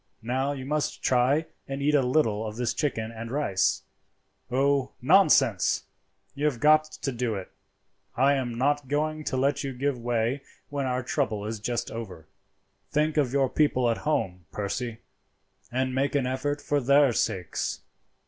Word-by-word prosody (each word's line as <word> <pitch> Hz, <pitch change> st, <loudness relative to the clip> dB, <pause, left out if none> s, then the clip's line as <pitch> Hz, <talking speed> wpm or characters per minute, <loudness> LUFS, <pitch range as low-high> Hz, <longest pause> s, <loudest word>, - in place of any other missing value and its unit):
Now 130 Hz, +4 st, 0 dB
you 130 Hz, -2 st, -6 dB
must 150 Hz, +1 st, -2 dB
try 130 Hz, +5 st, +3 dB, 0.2 s
and 135 Hz, 0 st, -4 dB
eat 145 Hz, +2 st, +1 dB
a 145 Hz, -, +5 dB
little 125 Hz, -5 st, +1 dB
of 105 Hz, -, -6 dB
this 120 Hz, 0 st, -1 dB
chicken 115 Hz, -7 st, -2 dB
and 115 Hz, 0 st, -7 dB
rice. 130 Hz, -8 st, +1 dB, 0.7 s
Oh, 135 Hz, +1 st, +1 dB
nonsense! 135 Hz, -, +4 dB, 0.5 s
you 145 Hz, -, -2 dB
have 140 Hz, -6 st, +1 dB
got 155 Hz, +3 st, +5 dB
to 145 Hz, -2 st, -5 dB
do 120 Hz, -3 st, -2 dB
it. 95 Hz, -2 st, -7 dB, 0.7 s
I 135 Hz, +3 st, +5 dB
am 125 Hz, -4 st, -2 dB
not 145 Hz, +2 st, +1 dB
going 155 Hz, +2 st, -1 dB
to 130 Hz, -, -1 dB
let 140 Hz, +3 st, +1 dB
you 135 Hz, -1 st, -3 dB
give 135 Hz, 0 st, -1 dB
way 120 Hz, +3 st, 0 dB, 0.3 s
when 140 Hz, -2 st, -2 dB
our 125 Hz, 0 st, -1 dB
trouble 115 Hz, -6 st, -1 dB
is 110 Hz, 0 st, -4 dB
just 120 Hz, +3 st, -2 dB
over. 95 Hz, -8 st, -7 dB, 0.6 s
"Think 155 Hz, +1 st, +1 dB
of 140 Hz, -5 st, +2 dB
your 135 Hz, -1 st, +2 dB
people 130 Hz, -4 st, +2 dB
at 115 Hz, -, -1 dB
home, 90 Hz, -, -2 dB
Percy, 110 Hz, +3 st, -4 dB, 0.7 s
and 130 Hz, +1 st, 0 dB
make 135 Hz, +2 st, 0 dB
an 140 Hz, -3 st, +2 dB
effort 140 Hz, +3 st, -2 dB
for 145 Hz, -1 st, +1 dB
their 140 Hz, 0 st, +5 dB
sakes. 95 Hz, -6 st, -2 dB
130 Hz, 165 wpm, -27 LUFS, 115-145 Hz, 0.7 s, a